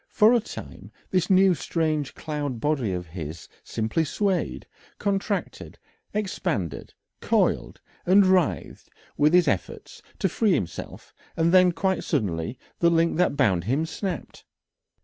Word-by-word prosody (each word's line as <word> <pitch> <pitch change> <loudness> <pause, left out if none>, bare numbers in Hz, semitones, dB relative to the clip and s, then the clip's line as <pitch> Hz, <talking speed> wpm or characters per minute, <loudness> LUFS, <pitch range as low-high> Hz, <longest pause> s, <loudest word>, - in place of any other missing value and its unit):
For 220 +2 +5
a 240 - +4
time 220 - -10 0.2
this 180 -2 +1
new 190 0 +5
strange 155 -4 -2
cloud 145 -5 -4
body 135 -6 0
of 90 -1 -3
his 80 -1 -8 0.2
simply 110 +9 -1
swayed, 190 +4 -1 0.3
contracted, 200 0 -3 0.3
expanded, 175 - -3 0.2
coiled, - - 0 0.2
and 195 +2 +5
writhed 185 -4 0 0.3
with 150 +1 +3
his 180 -3 +5
efforts 100 - -3 0.2
to - - +1
free 205 +3 +1
himself, 85 - -5 0.2
and 165 0 +3
then 185 -1 +6
quite 190 +2 -1
suddenly 105 - -2 0.2
the 170 - +4
link 165 -1 +2
that 180 -5 +2
bound 95 -11 +2
him 135 +8 0
snapped. 175 - -5
165 Hz, 130 wpm, -25 LUFS, 120-185 Hz, 0.3 s, then